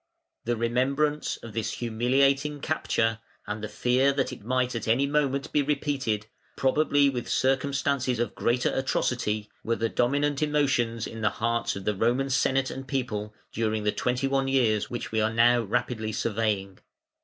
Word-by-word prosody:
] - - -53
The 120 +1 +1
remembrance 135 +6 0
of 115 - -9
this 115 -2 -2
humiliating 135 +5 +1
capture 115 -7 0 0.3
and 105 +1 -5
the - - -2
fear 125 +5 +2
that 135 -1 -1
it - - -11
might 125 +2 0
at 115 - -4
any 120 +5 +3
moment 140 -1 0
be 150 - +3
repeated, 135 -7 -1 0.3
probably 145 +1 +3
with 125 -3 -2
circumstances 135 -1 +1
of 120 +1 -1
greater 120 +1 +1
atrocity, 115 -5 -1 0.2
were 115 - 0
the 115 0 -1
dominant 145 +5 +1
emotions 135 -7 +1
in 115 - -7
the 105 - +3
hearts 115 +3 -1
of 100 - -7
the 105 - +1
Roman 120 +7 +1
Senate 135 0 +1
and 135 0 -7
people 105 -6 -3 0.2
during 110 -1 -1
the 105 - +2
twenty 125 +4 -1
one 135 0 +1
years 120 -6 +2
which 120 - -5
we 110 -1 +1
are 110 +1 +1
now 120 +1 +4
rapidly 115 0 -2
surveying. 105 -4 -1
125 Hz, 165 wpm, -27 LUFS, 115-135 Hz, 0.3 s, now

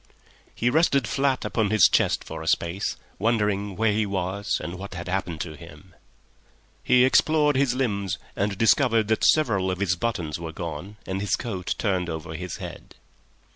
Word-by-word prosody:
He 120 +1 +1
rested 140 -6 +3
flat 135 -2 0
upon 110 -3 0
his 110 -3 +6
chest - - +1
for 80 0 -7
a 80 - -7
space, 85 +5 0 0.2
wondering 105 -3 0
where 110 +1 +2
he 105 0 0
was 95 +1 -2
and 90 +1 -6
what 100 -1 -7
had 85 0 -6
happened 90 -3 -2
to 80 -3 -5
him. 85 +4 -14 0.9
He 125 0 +5
explored 150 +2 +3
his 130 -2 +2
limbs, 100 -8 -1 0.2
and 100 0 -1
discovered 115 -1 +3
that 110 - +1
several 105 -12 +3
of 95 - -1
his 95 -2 +1
buttons 90 -8 -3
were 80 -1 -6
gone 85 +5 -6
and 95 +1 -3
his 100 -3 +1
coat 95 -7 -4
turned 95 -5 0
over 80 0 -5
his 90 +1 -5
head. - - -9
100 Hz, 175 wpm, -25 LUFS, 90-115 Hz, 0.9 s, his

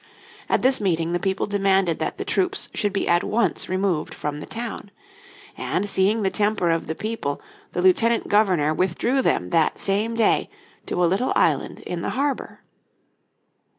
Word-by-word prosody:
At - - +1
this 260 -2 +3
meeting 170 -3 0
the 175 - +1
people 190 +2 -1
demanded 195 -4 +1
that - - -3
the - - -4
troops 380 +1 -1
should 205 -2 -1
be 195 - -1
at 175 0 +3
once 235 +2 0
removed 185 -4 -1
from 150 0 -4
the - - -8
town. 230 -3 -5 0.7
And 205 - -2
seeing 205 +3 +2
the 190 - +1
temper 205 -5 +1
of 165 0 -1
the 160 - -3
people 215 -10 -3 0.3
the 180 - -1
Lieutenant 225 +5 +3
Governor 185 -8 +3
withdrew 190 - 0
them 90 - 0
that 160 -1 +2
same 210 +4 0
day 230 - +2 0.4
to 180 - 0
a - - +5
little 195 +9 +1
island - - +1
in 175 -1 -5
the - - -2
harbour. 280 +1 -2
195 Hz, 170 wpm, -23 LUFS, 175-225 Hz, 0.7 s, a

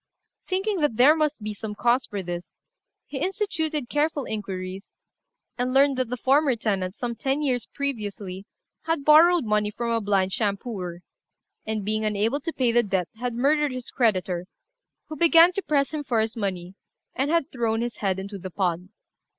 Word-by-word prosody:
Thinking 385 +1 -1
that 290 -7 +1
there 275 +6 +7
must 300 -7 -1
be 215 0 -3
some 210 0 -6
cause 240 +4 +2
for 200 -2 -4
this, 175 0 -5 0.6
he 275 - -6
instituted 320 - -2
careful 295 0 0
inquiries, 195 -2 -6 0.6
and 250 +1 0
learned 275 0 +5
that 255 -3 -1
the 250 - -3
former 275 +2 +3
tenant, 195 -4 -2
some 240 -1 -3
ten 275 +5 -1
years 250 -4 0
previously, 205 -8 -5 0.4
had 325 -3 -1
borrowed 325 0 +6
money 210 -1 +1
from 235 +2 -3
a 230 -1 +1
blind 195 -2 +1
shampooer, 200 -5 -3 0.7
and, 215 -2 -2
being 215 +1 -1
unable 215 +6 0
to 330 +3 -4
pay 255 -6 +1
the 240 +1 +4
debt, 190 -6 -1
had 245 -1 -3
murdered 290 +3 +2
his 255 -1 -6
creditor, 185 -7 0 0.6
who 310 - -6
began 335 +2 +6
to 395 - -2
press 280 -6 +1
him 305 -1 -3
for 240 -5 0
his 220 +1 -1
money, 185 -4 -3 0.4
and 270 +2 -1
had 330 -2 +1
thrown 230 -3 0
his 240 0 -3
head 190 -2 0
into 195 +1 -6
the 185 +1 -6
pond. 180 -1 -2
235 Hz, 175 wpm, -25 LUFS, 200-285 Hz, 0.7 s, there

